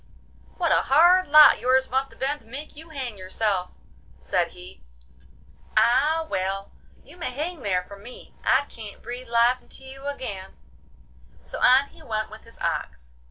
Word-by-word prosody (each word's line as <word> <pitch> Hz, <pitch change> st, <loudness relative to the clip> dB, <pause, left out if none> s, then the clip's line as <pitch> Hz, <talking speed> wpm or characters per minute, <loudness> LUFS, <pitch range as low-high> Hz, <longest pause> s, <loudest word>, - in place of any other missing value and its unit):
'What 340 Hz, -3 st, +1 dB
a -, -, +4 dB
hard 350 Hz, +6 st, +5 dB
lot 300 Hz, +1 st, +8 dB
yours 260 Hz, +1 st, +2 dB
must 265 Hz, +2 st, -1 dB
have -, -, -18 dB
been 280 Hz, +3 st, -1 dB
to -, -, -24 dB
make 280 Hz, +7 st, -8 dB
you 320 Hz, +2 st, -12 dB
hang 255 Hz, -9 st, -6 dB
yourself!' 185 Hz, 0 st, -1 dB, 0.5 s
said 65 Hz, -, 0 dB
he. 65 Hz, -, -13 dB, 1.0 s
'Ah, 275 Hz, +8 st, +3 dB
well! 195 Hz, -3 st, -3 dB, 0.3 s
you -, -, -15 dB
may 330 Hz, -, -3 dB
hang 310 Hz, +7 st, -4 dB
there 185 Hz, -6 st, -1 dB
for 200 Hz, +2 st, -13 dB
me; 235 Hz, +5 st, -12 dB
I 285 Hz, -, +3 dB
can't 215 Hz, -3 st, -10 dB
breathe 245 Hz, +1 st, -6 dB
life 235 Hz, +2 st, +3 dB
into -, -, -9 dB
you 270 Hz, +1 st, -9 dB
again.' 200 Hz, -9 st, -6 dB, 0.9 s
So -, -, -7 dB
on 265 Hz, +3 st, +5 dB
he -, -, -19 dB
went 215 Hz, -1 st, -3 dB
with 220 Hz, -, -12 dB
his 230 Hz, -, -16 dB
ox. 60 Hz, 0 st, -4 dB
250 Hz, 165 wpm, -24 LUFS, 205-285 Hz, 1.0 s, lot